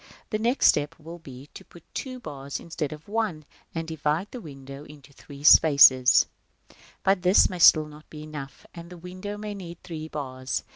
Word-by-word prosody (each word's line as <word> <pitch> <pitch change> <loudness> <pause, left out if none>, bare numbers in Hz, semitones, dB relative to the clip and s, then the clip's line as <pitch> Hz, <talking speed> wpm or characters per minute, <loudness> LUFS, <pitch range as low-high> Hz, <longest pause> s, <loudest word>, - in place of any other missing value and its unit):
The 215 - -1
next 240 +5 +1
step 150 +3 +3
will 165 +2 -11
be 135 -4 -12
to - - -11
put 170 - -17
two 255 -1 -6
bars 140 - -7
instead 160 -3 -5
of 155 0 -11
one, 205 -8 -3 0.3
and 165 0 -4
divide 160 +3 -2
the 250 - -8
window 140 -3 -11
into 145 -2 -16
three 140 0 -13
spaces 145 -3 +8
as 125 -3 +4
at - - -16
d. - - -22 0.3
But 195 -1 +2
this 185 +2 +4
may 180 - -6
still 155 -2 +7
not 150 0 -15
be 150 -1 -10
enough, 150 -3 -9
and 170 -1 -11
the 180 - -11
window 185 +4 -8
may 210 0 -6
need 175 -4 -9
three 160 -3 -7
bars. 130 -5 -5
155 Hz, 200 wpm, -25 LUFS, 140-180 Hz, 0.3 s, spaces